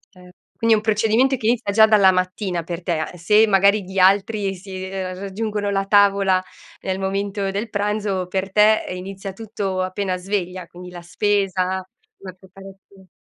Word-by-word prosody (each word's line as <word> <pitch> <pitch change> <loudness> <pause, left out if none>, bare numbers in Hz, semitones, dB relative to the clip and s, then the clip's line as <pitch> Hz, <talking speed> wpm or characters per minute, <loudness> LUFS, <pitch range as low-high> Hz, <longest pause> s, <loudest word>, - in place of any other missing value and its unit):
Eh, 180 0 -16 0.3
quindi 230 0 +3
è - - +1
un - - -3
procedimento 225 +5 +2
che 220 - -8
inizia 230 -3 0
già 220 +1 +6
dalla 205 -3 +5
mattina 185 -1 -2
per 170 +1 -6
te. 165 -3 -1
Se 210 +6 +4
magari 200 +1 +3
gli 190 +1 -9
altri 200 +1 +2
si 185 0 -8
ehm, 185 -1 -5
raggiungono 205 +1 -3
la 195 -1 -1
tavola 195 -2 +3 0.4
nel 190 0 -3
momento 195 +1 -2
del 210 +4 -4
pranzo, 205 -2 -2
per 190 +1 -3
te, 215 +1 +4
ehm, 180 - -5
inizia 195 +1 -7
tutto 195 -3 -4
appena 185 0 -2
sveglia, 185 -1 -4
quindi 180 +1 -11
la 175 -1 -10
spesa, 195 +1 0 0.6
la 185 -1 -9
preparazio 195 +1 -16
195 Hz, 170 wpm, -21 LUFS, 185-205 Hz, 0.6 s, già